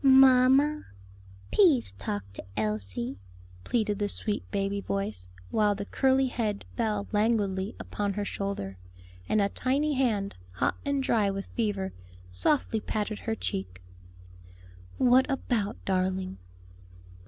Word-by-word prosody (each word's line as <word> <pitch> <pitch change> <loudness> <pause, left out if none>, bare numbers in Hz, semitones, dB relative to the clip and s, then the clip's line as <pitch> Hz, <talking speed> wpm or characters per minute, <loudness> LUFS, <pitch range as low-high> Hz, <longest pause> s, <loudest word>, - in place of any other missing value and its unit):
"Mamma, 265 +2 +6 0.7
pease 315 - +4
talk 100 +1 -4
to - - -7
Elsie," 105 -1 -2 0.4
pleaded 215 -4 0
the 205 0 0
sweet 210 0 -3
baby 200 0 -1
voice, 200 - -3 0.2
while 210 -1 +3
the 200 0 -4
curly 265 +4 +3
head 220 -5 -2
fell 210 -4 -1
languidly 205 -2 +1
upon 205 -1 -2
her 205 +1 -2
shoulder, 195 - -4 0.5
and 215 - +3
a 200 -1 +3
tiny 280 +7 0
hand, 220 -7 +1 0.2
hot 90 - 0
and 280 -1 0
dry 215 -5 +2
with 195 0 -3
fever, 205 -4 -1 0.4
softly 220 - +1
patted 215 0 -3
her 225 -1 -2
cheek. 90 - -4 1.1
"What 255 +2 +5
about, 235 -6 -1
darling?" 185 - -1
205 Hz, 120 wpm, -28 LUFS, 195-250 Hz, 1.1 s, Mamma